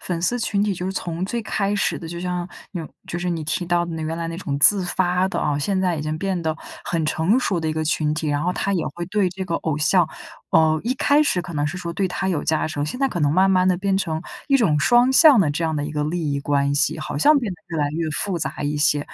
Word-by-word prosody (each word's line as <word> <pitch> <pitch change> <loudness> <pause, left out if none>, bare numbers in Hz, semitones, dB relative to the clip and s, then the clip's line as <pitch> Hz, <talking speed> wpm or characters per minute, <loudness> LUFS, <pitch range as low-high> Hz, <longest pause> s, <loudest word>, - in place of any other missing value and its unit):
粉 175 -2 -3
丝 240 +8 0
群 205 -3 0
体 205 -2 0
就 180 +1 -4
是 190 - -2
从 175 -1 -3
最 235 +4 -3
开 205 -1 -1
始 200 - 0
的 165 - -8
就 170 +1 -6
像 180 0 -3 0.2
纽 165 -5 -5 0.2
就 175 - -4
是 180 +1 -2
你 165 -2 -3
提 160 +3 -2
到 175 0 +1
的 170 - -6
那 160 - -4
原 160 +1 -3
来 165 0 -3
那 165 - -5
种 145 -7 -3
自 190 +6 +6
发 180 +1 +1
的 - - -3
啊， 145 -1 0
现 190 +6 0
在 180 -3 +1
已 - - -3
经 155 +1 -3
变 190 0 -1
得 160 -1 -2 0.3
很 165 -2 -1
成 165 +10 +2
熟 190 -9 0
的 160 - -2
一 - - 0
个 155 0 -2
群 150 -1 0
体。 155 0 -2
然 145 0 -1
后 180 +2 0
它 195 +2 -1
也 180 -4 0
会 175 - -4
对 195 0 +1
这 190 +2 -6
个 170 -2 -3
偶 160 -3 -2
像 165 +2 +3 0.4
呃， 160 -1 +4
一 240 - +1
开 285 +3 +3
始 235 -11 +1
可 175 - -8
能 145 0 0
是 160 +5 -4
说 170 -1 -5
对 190 +3 0
他 190 +1 -2
有 170 -6 -1
加 155 -1 +1
成， 145 -2 -2
现 155 +12 -5
在 275 - +3
可 175 - -4
能 145 -1 +2
慢 190 +3 +4
慢 185 -1 +3
地 185 - +4
变 195 0 0
成 160 -5 -2 0.3
一 275 - +5
种 170 - +2
双 240 - +4
向 290 -5 +7
的 160 -6 +2
这 165 +3 -2
样 160 -1 0
的 145 - -2
一 150 - -5
个 150 -1 -2
利 160 0 -2
益 140 - -1
关 140 0 +1
系， 145 +2 +1
好 155 - -5
像 295 - +5
变 235 -6 -3
得 - - -19
越 165 -2 -3
来 145 -1 +1
越 165 0 -2
复 185 +3 -2
杂 150 -1 -4
一 145 +1 -1
些。 150 0 +2
170 Hz, 315 characters per minute, -22 LUFS, 155-190 Hz, 0.4 s, 向